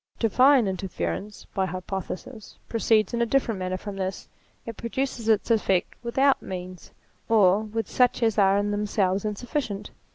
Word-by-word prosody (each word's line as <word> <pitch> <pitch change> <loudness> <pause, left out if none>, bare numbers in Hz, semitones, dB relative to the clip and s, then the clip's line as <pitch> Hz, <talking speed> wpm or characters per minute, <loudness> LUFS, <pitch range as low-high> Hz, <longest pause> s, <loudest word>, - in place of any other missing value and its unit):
Divine 255 +3 +4
interference, 190 - -4
by 190 -1 0
hypothesis, 190 +5 -6
proceeds 220 -2 +2
in 235 - 0
a - - +3
different 230 -5 +1
manner 185 0 -2
from 200 +1 -7
this: 190 0 -4 0.4
it 230 - -6
produces 235 -1 -3
its 220 +1 +2
effect 195 -5 +1
without 265 +3 +2
means, 180 -1 -8 0.4
or 205 -3 +5
with 220 +1 -4
such 250 -1 +2
as 225 -2 +2
are 195 0 +5
in 205 0 0
themselves 205 -1 0
insufficient. 210 -1 -3
210 Hz, 150 wpm, -25 LUFS, 190-230 Hz, 0.4 s, or